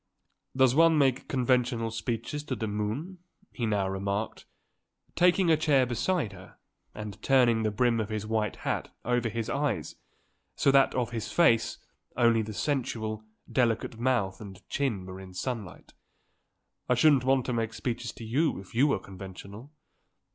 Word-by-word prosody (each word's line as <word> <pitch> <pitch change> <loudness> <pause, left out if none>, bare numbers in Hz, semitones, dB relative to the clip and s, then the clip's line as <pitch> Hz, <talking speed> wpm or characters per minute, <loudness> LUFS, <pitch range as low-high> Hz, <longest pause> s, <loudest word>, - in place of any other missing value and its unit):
"Does 130 -2 +5
one 165 +2 +5
make 135 -3 +2
conventional 125 -3 +1
speeches 115 +6 -3
to 130 - -2
the 115 - -3
moon?" 110 - -3 0.3
he 120 -3 -2
now 100 -3 +1
remarked, 100 +3 -3 0.7
taking 180 0 +4
a - - +6
chair 145 -4 +3
beside 125 - -1
her 95 -1 -14 0.4
and 105 -1 -7
turning 120 -4 +4
the 110 - +1
brim 115 +2 +1
of 110 -1 -2
his 110 -1 -3
white 110 -1 -1
hat - - -2
over 120 -1 +1
his 115 0 -3
eyes 145 +1 -2 0.6
so 140 - +3
that 135 0 +4
of 125 -2 -1
his 115 -2 -4
face 155 -10 +3 0.4
only 115 -2 +4
the 110 0 -5
sensual, 110 -4 -2 0.2
delicate 115 -2 0
mouth 115 -7 0
and 100 -3 -11
chin 115 -10 -1
were 95 0 -8
in 95 -1 -11
sunlight. 110 0 -5 1.0
"I 125 - +4
shouldn't 135 0 +5
want 130 -1 +2
to 125 - -2
make 115 -1 -1
speeches 115 +1 -4
to - - -10
you 140 +6 +1
if 95 - -13
you 130 +6 +4
were 140 - +2
conventional. 100 +6 -10
115 Hz, 160 wpm, -28 LUFS, 105-135 Hz, 1.0 s, a